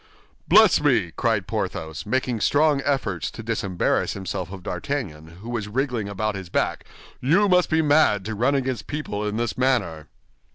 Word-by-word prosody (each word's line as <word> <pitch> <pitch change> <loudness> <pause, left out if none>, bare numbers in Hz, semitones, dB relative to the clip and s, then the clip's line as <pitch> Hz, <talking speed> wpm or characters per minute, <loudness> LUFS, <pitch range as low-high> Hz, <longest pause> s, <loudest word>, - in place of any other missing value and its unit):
"Bless - - +6
me!" - - +2
cried - - 0
Porthos, 80 +4 -4
making 125 -1 0
strong 145 +1 +3
efforts 130 - -1
to 115 - -9
disembarrass 100 -5 -1
himself 95 -2 -5
of 95 -2 -9
D'Artagnan, 90 - -4 0.2
who 115 - -7
was 110 -4 -3
wriggling 120 -2 -2
about 105 +2 -2
his 95 -3 -7
back; - - -1 0.3
"you 170 +11 +3
must 180 -2 +3
be 160 0 +2
mad 145 -10 +3
to 110 - -3
run 125 +7 +1
against 130 -4 -2
people 145 -9 -4
in 105 +1 -3
this 120 +1 -2
manner." 115 - 0
115 Hz, 165 wpm, -23 LUFS, 100-140 Hz, 0.3 s, Bless